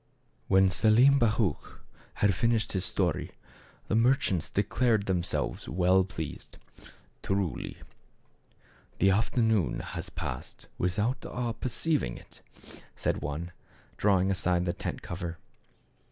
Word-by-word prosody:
When 95 0 +5
Selim 115 +9 +5
Baruch 105 - 0 0.4
had 100 -1 +3
finished 115 +4 +1
his 95 -1 -1
story 90 -6 -1 0.5
the - - -2
merchants 115 - +2
declared 105 +1 +1
themselves 90 -3 -1
well 90 +2 +3
pleased. 80 -5 -7 0.6
"Truly, 95 -4 -2 1.2
the 95 +1 +4
afternoon 110 - +1
has - - -5
passed - - -6
without 105 +8 0
our 120 -2 -3
perceiving 125 - -1
it! - - -17 0.5
" - - -37
said - - -1
one, 75 +4 -4 0.5
drawing 95 -2 +3
aside 90 -2 +1
the 85 - 0
tent. - - -5
cover. 85 -1 -5
95 Hz, 110 wpm, -29 LUFS, 90-115 Hz, 1.2 s, When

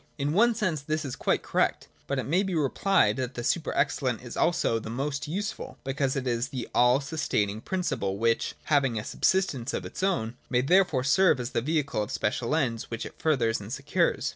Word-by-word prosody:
In 145 +1 -1
one 230 +5 +4
sense 185 -9 -1
this 155 +1 -2
is 130 - -4
quite - - 0
correct: - - 0 0.2
but 140 - -1
it 130 - -2
may 175 +7 +2
be 190 -3 -2
rephed 150 - +2
that 130 0 -3
the 120 - -4
super 160 +6 0
excellent 130 -4 0
is 120 - -8
also 170 -9 +2
the 110 - -8
most 140 +5 -3
useful: 200 +7 -4
because 135 0 -1
it 135 -2 -2
is 120 0 0
the 130 -3 -5
all 125 +2 +5
sustaining 110 -8 -1
principle 125 - -2
which, 115 +1 +1
having 135 -6 +2
a 105 - -2
subsistence 165 -10 0
of - - -4
its - - -7
own, 125 -12 0
may 125 -1 +2
therefore 160 -3 +3
serve 155 +1 +4
as 125 +1 -4
the - - 0
vehicle 140 -3 0
of 105 - -3
special 115 +6 -1
ends 120 -8 -1
which 115 -1 -4
it - - -11
furthers 120 -8 +2
and 105 +2 -9
secures. 145 +6 0
135 Hz, 205 wpm, -27 LUFS, 120-160 Hz, 0.2 s, all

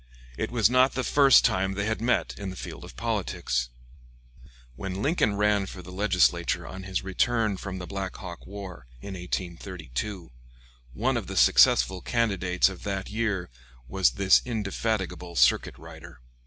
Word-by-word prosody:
It - - -3
was 115 -4 +3
not 125 +2 +4
the 130 - -1
first 140 -2 +6
time 95 +1 +1
they 100 +1 -1
had 110 +1 -2
met 125 +2 +1
in 100 -1 -4
the 95 - -7
field - - -8
of - - -11
politics. - - -2 1.1
When 95 +6 -5
Lincoln 140 - +1
ran 105 -1 +2
for 90 - -9
the 90 - -11
Legislature 90 -3 +1
on 95 - -8
his 95 -1 -3
return 110 +2 +1
from 95 -1 -6
the. 90 - -6
Black 95 0 -5
Hawk 90 -2 -9
war, 95 -9 -9
in 100 - -8
1832, 90 - -5 0.6
one - - +1
of - - -4
the - - -5
successful 90 +9 +5
candidates 95 -7 +1
of 95 -2 -6
that 95 -1 -4
year 105 - -2 0.4
was 95 +7 +2
this 100 -2 +4
indefatigable 105 -5 -3
circuit - - +3
rider. 80 -1 -12
95 Hz, 155 wpm, -27 LUFS, 90-105 Hz, 1.1 s, first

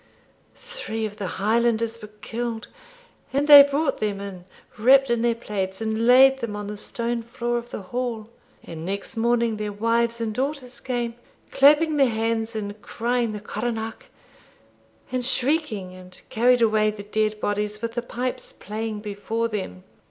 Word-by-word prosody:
Three 480 - -5
of 210 -1 -7
the 200 - -3
Highlanders 230 +2 +1
were 210 - -9
killed, 230 -1 -4 0.6
and 280 +2 0
they 290 -1 +12
brought 285 0 +1
them 205 -2 -1
in 195 -3 -8 0.3
wrapped 265 +3 +5
in 235 -1 +1
their 235 -1 +2
plaids, 195 -4 -4
and 220 +1 -1
laid 265 +2 +7
them 230 -4 -4
on 205 0 -5
the 210 +1 -5
stone 235 +3 -3
floor 240 +1 -2
of 235 0 -12
the 205 - -6
hall; 235 +1 -4 0.4
and 160 -1 -8
next 195 +5 -4
morning, 235 -1 +1
their 210 -1 -3
wives 230 +2 0
and 225 -2 -2
daughters 260 0 -3
came, 240 -2 -2 0.4
clapping 300 +2 +5
their 270 -3 +4
hands, 225 0 -1
and 205 -1 -5
crying 240 0 -1
the 210 - -5
coronach, 220 +2 -4 1.0
and 255 -1 -1
shrieking, 255 - 0
and 185 0 -12
carried 245 +1 +3
away 215 -1 +3
the 210 -1 -7
dead 215 +1 -1
bodies, 210 0 -2
with 230 0 -2
the 240 - -2
pipes 250 +1 -4
playing 215 +1 -5
before 215 +2 -2
them. 190 - -5
230 Hz, 160 wpm, -24 LUFS, 210-245 Hz, 1.0 s, they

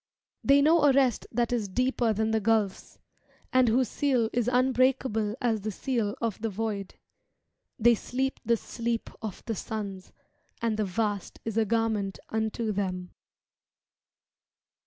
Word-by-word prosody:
They 280 +1 +5
know 315 0 +5
a 285 - +7
rest 260 -4 +2
that 240 +1 0
is 225 -4 0
deeper 250 +2 +1
than 220 +1 0
the 220 - +2
gulfs, 215 -2 0 0.6
And 255 -1 +5
whose 245 +3 +3
seal 250 -3 +1
is 245 -1 +1
unbreakable 255 -4 +2
as 225 -4 0
the 215 - -3
seal 215 -1 -1
of 225 -3 -2
the 225 - -1
void; 205 -1 -4 0.8
They 235 +2 +5
sleep 260 +4 -2
the 235 0 +2
sleep 235 +1 -3
of 215 -4 -6
the 230 - -2
suns. 200 -3 -5 0.5
And 225 -2 0
the 215 - +1
vast 205 0 -2
is 225 -2 -3
a 225 -1 +3
garment 215 -3 0
unto 220 0 -1
them. 185 -3 -3
225 Hz, 145 wpm, -28 LUFS, 210-245 Hz, 0.8 s, a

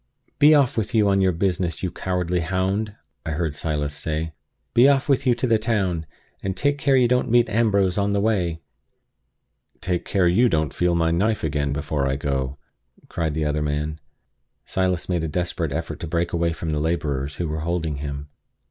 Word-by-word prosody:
"Be 150 +1 +7
off 140 -5 +3
with 110 +2 -1
you 105 -2 +4
on 95 0 +3
your 95 -1 +4
business, 90 -1 -1
you 90 - -1
cowardly 90 -1 -1
hound!" 95 +5 -1 0.3
I 80 - -3
heard 80 -1 -2
Silas 75 -1 -2
say. 80 +2 -3 0.4
"Be 125 +4 +6
off 135 -2 +2
with 140 -1 +2
you 120 - +4
to 120 - -1
the 115 -3 +3
town! 95 -8 -1 0.3
and 95 -1 -3
take 145 0 +1
care 135 -1 +3
you 125 -2 +5
don't 125 +1 +1
meet 120 +1 +4
Ambrose 100 -4 +2
on 100 0 +1
the 100 - +2
way!" 90 -6 0 1.2
"Take 90 -2 -1
you - - -9
care 95 -3 +3
you 115 +8 +4
don't 80 -5 0
feel 90 -1 +1
my 80 -1 +2
knife 105 +6 +1
again 70 -2 0
before 70 -1 -1
I 65 - 0
go!" 70 -1 -2 0.5
cried 80 -3 -2
the 80 -1 0
other 75 0 0
man. 75 +1 -2 0.7
Silas 95 -2 -1
made 85 -3 0
a - - -1
desperate 85 -1 -2
effort 80 +3 -4
to 85 - -5
break 85 +2 -1
away 85 0 +1
from 80 0 -4
the 75 - 0
laborers 75 -3 -1
who 85 - -2
were 80 +1 -3
holding 80 -2 -2
him. 70 0 -5
85 Hz, 200 wpm, -23 LUFS, 75-100 Hz, 1.2 s, Be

